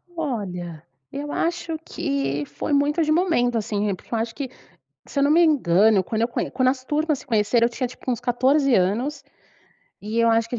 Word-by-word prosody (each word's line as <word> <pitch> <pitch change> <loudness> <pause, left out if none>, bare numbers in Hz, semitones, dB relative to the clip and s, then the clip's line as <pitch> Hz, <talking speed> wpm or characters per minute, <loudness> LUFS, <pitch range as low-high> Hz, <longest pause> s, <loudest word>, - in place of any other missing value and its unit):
Olha, 180 - -4 0.3
eu 290 +1 -5
acho 335 -1 -2
que 140 +1 -2
foi 290 - -4
muito 295 +4 +2
de 310 - 0
momento, 310 -9 +2
assim, 210 -2 -1
porque 235 - -13
eu - - +1
acho 225 0 -3
que 275 -3 -4 0.6
se 280 - -5
eu - - +3
não 285 - +3
me 340 +3 +5
engano, 210 - +4
quando 220 +4 -2
eu 235 - +2
conh - - -3
quando 255 -1 +1
as 255 -1 -1
turmas 300 0 0
se - - -15
conheceram, 230 0 +2
eu - - -3
tinha 255 +1 -2
tipo 255 +1 -7
uns 245 - -1
14 260 +2 +2
anos 220 +11 0 0.8
e 215 +3 -3
eu 230 0 +4
acho 225 0 +2
que 245 - -5
a - - -2
245 Hz, 210 wpm, -23 LUFS, 210-290 Hz, 0.8 s, me